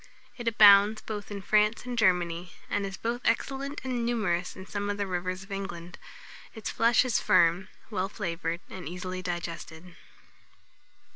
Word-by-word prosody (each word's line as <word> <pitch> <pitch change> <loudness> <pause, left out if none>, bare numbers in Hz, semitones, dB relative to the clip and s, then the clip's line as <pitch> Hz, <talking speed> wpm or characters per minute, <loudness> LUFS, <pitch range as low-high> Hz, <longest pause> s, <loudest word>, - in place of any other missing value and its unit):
It 240 -2 -7
abounds 210 -1 +7
both 210 -2 -6
in 200 -2 -6
France 210 +3 +2
and 250 -1 -4
Germany; 180 -5 +1 0.2
and 200 -1 0
is 190 -1 -7
both 235 +4 -2
excellent 275 +4 -1
and 250 -2 -2
numerous 205 -7 -1
in 185 - -9
some 205 +1 -3
of 205 - -2
the 200 - -1
rivers 185 0 -3
of 195 - -16
England. 180 -3 -6 0.6
Its 220 - -4
flesh 230 +2 +4
is 245 - +1
firm, 175 +2 +3 0.2
well 195 -2 -1
flavoured, 170 -4 -3
and 185 -3 -7
easily 185 +1 -5
digested. 170 -1 -6
195 Hz, 155 wpm, -28 LUFS, 180-220 Hz, 0.6 s, abounds